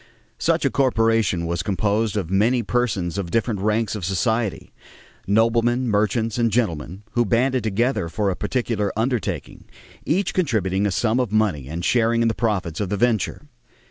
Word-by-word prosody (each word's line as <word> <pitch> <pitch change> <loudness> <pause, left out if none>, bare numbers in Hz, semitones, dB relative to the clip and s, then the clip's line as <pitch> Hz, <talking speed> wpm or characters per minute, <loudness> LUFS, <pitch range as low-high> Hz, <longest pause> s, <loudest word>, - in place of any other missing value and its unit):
Such - - +1
a - - +2
corporation 115 -8 +2
was 85 0 -1
composed 105 +3 0
of 90 -4 -3
many 115 +5 +2
persons 100 -6 -1
of 90 -4 -4
different 115 0 0
ranks 110 +2 0
of 105 -4 -5
society 105 +4 -1 0.5
noblemen, 115 +4 +2
merchants, 110 +2 0
and 115 -1 +3
gentlemen 95 -5 -2
who 120 - +2
banded 125 +3 +1
together 110 -3 0
for 100 +3 0
a - - -3
particular 115 -5 -1
undertaking, 120 -2 -2 0.4
each 190 +5 0
contributing 105 - 0
a - - -1
sum 110 +5 +1
of 125 -5 -1
money 100 -11 +1
and 85 +4 -4
sharing 115 -1 +2
in 115 - +3
the - - 0
profits 100 -9 -1
of 100 -3 -2
the 105 - -1
venture. 115 +2 0
110 Hz, 165 wpm, -22 LUFS, 95-120 Hz, 0.5 s, and